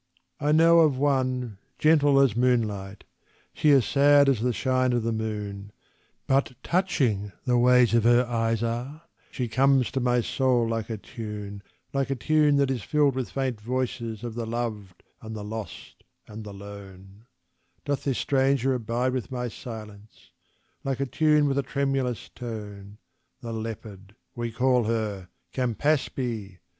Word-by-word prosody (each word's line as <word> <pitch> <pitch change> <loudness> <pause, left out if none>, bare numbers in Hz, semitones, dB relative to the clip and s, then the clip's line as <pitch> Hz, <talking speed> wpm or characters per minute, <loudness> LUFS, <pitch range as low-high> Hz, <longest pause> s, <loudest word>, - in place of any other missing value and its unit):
I 150 - +1
know 165 +2 +6
of 150 -5 +4
one, 130 -6 0 0.2
gentle 145 -3 +4
as 130 -6 +3
moonlight 110 -5 0 0.5
she 155 - +2
is 135 -4 +5
sad 145 0 +5
as 130 -5 +2
the 125 +1 +1
shine 130 +1 +1
of 120 -2 0
the 115 - 0
moon, 105 -2 -4 0.5
But 135 -1 +1
touching 130 - 0
the 125 -1 +3
ways 125 -1 +5
of 115 -2 +4
her 120 +1 +5
eyes 115 -1 0
are: 125 +7 -4 0.3
she 125 -3 -3
comes 135 +2 +3
to 135 - -1
my 125 -1 +2
soul 125 -1 +1
like 115 0 -3
a 110 - -3
tune 105 -2 -7 0.3
Like 135 -1 0
a 135 - 0
tune 150 +3 +3
that 140 -1 +2
is 125 -4 -2
filled 145 +3 +2
with 130 -1 -3
faint 130 -5 -3
voices 120 -2 -3
of 120 -2 -5
the 115 0 -4
loved 110 -6 -5 0.2
and 110 0 -7
the 105 - -6
lost 110 0 -8 0.2
and 110 +1 -8
the 105 - -8
lone, 100 +1 -12 0.6
Doth 145 -1 -2
this 135 -3 -1
stranger 135 -1 +2
abide 125 +1 -1
with 130 -2 -3
my 125 -1 -3
silence: 110 -3 -11 0.5
like 135 -1 -2
a 140 - 0
tune 150 +2 +3
with 140 0 +1
a - - +3
tremulous 135 -3 -2
tone. 105 -4 -8 0.4
The 115 -1 -6
leopard, 110 -3 -7 0.2
we 120 -1 -4
call 125 0 +2
her, 105 -5 -2 0.2
Campaspe! 125 - -1
120 Hz, 155 wpm, -26 LUFS, 110-135 Hz, 0.6 s, know